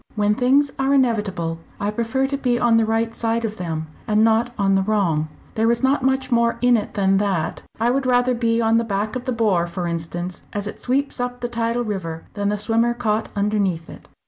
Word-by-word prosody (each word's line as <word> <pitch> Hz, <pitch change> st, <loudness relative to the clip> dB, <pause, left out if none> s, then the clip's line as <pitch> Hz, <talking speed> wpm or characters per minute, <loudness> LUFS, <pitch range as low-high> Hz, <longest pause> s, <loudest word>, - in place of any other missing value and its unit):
When 210 Hz, -1 st, +2 dB
things 270 Hz, +4 st, +3 dB
are 270 Hz, +1 st, +2 dB
inevitable, 205 Hz, -10 st, 0 dB, 0.2 s
I 205 Hz, +1 st, -1 dB
prefer 235 Hz, +5 st, 0 dB
to 275 Hz, +1 st, -2 dB
be 250 Hz, -3 st, 0 dB
on 235 Hz, -2 st, +3 dB
the 225 Hz, -1 st, +2 dB
right 225 Hz, +1 st, 0 dB
side 230 Hz, 0 st, -1 dB
of 220 Hz, 0 st, -4 dB
them, 160 Hz, -3 st, -3 dB, 0.2 s
and 215 Hz, 0 st, +3 dB
not 225 Hz, +2 st, +3 dB
on 195 Hz, -1 st, +2 dB
the 195 Hz, -, +3 dB
wrong. 190 Hz, -7 st, +1 dB, 0.3 s
There 225 Hz, +1 st, +2 dB
is 235 Hz, +2 st, +1 dB
not 270 Hz, +2 st, +3 dB
much 265 Hz, 0 st, 0 dB
more 235 Hz, 0 st, +2 dB
in 245 Hz, 0 st, +4 dB
it 215 Hz, -, -2 dB
than 195 Hz, -1 st, +3 dB
that. 195 Hz, -5 st, -1 dB, 0.2 s
I 235 Hz, +2 st, +2 dB
would 265 Hz, 0 st, 0 dB
rather 250 Hz, 0 st, +3 dB
be 230 Hz, -1 st, +1 dB
on 225 Hz, 0 st, +3 dB
the 230 Hz, -, +2 dB
back 210 Hz, +1 st, -2 dB
of 250 Hz, 0 st, -4 dB
the 255 Hz, -, -1 dB
'bore' 205 Hz, -7 st, +1 dB
for 175 Hz, +1 st, -4 dB
instance, 170 Hz, +1 st, -4 dB
as 205 Hz, 0 st, -3 dB
it 210 Hz, -, -7 dB
sweeps 275 Hz, +2 st, -1 dB
up 245 Hz, 0 st, -3 dB
the 240 Hz, -, -1 dB
tidal 235 Hz, 0 st, -1 dB
river, 175 Hz, -7 st, -4 dB
than 205 Hz, -1 st, -1 dB
the 210 Hz, -, 0 dB
swimmer 230 Hz, +3 st, +1 dB
caught 220 Hz, -2 st, -1 dB
underneath 200 Hz, -5 st, 0 dB
it." -, -, -13 dB
225 Hz, 225 wpm, -22 LUFS, 200-245 Hz, 0.3 s, in